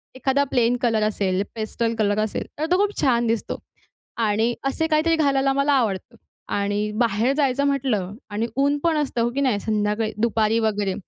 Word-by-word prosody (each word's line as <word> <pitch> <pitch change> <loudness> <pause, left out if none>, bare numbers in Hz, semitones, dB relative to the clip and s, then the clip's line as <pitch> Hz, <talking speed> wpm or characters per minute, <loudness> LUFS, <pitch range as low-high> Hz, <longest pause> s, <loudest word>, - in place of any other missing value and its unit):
एखादा 265 +2 +1
plain 245 -1 +3
colour 225 -3 +2
असेल, 195 -3 0
pastel 225 +1 -2
colour 205 -1 +2
असेल 215 - -3
तर 310 - 0
तो 360 - +5
खूप 410 +1 +1
छान 240 -3 +2
दिसतो 225 -1 -1 0.6
आणि 225 +1 +1
असे 320 +4 0
काहीतरी 320 +1 +2
घालायला 275 -3 +2
मला 280 +1 +2
आवडतं. 230 -3 -1 0.4
आणि 205 +1 -1
बाहेर 230 +2 +2
जायचं 280 -2 +1
म्हटलं 250 -9 0 0.2
आणि 215 +3 -2
ऊनपण 290 +4 +1
असतं 280 -5 -1
हो, 235 - +2
की 280 - 0
नाही 250 -7 +1
संध्याकाळी 215 +1 -1
दुपारी 225 -1 +2
वगैरे. 210 -3 0
235 Hz, 170 wpm, -23 LUFS, 215-275 Hz, 0.6 s, तो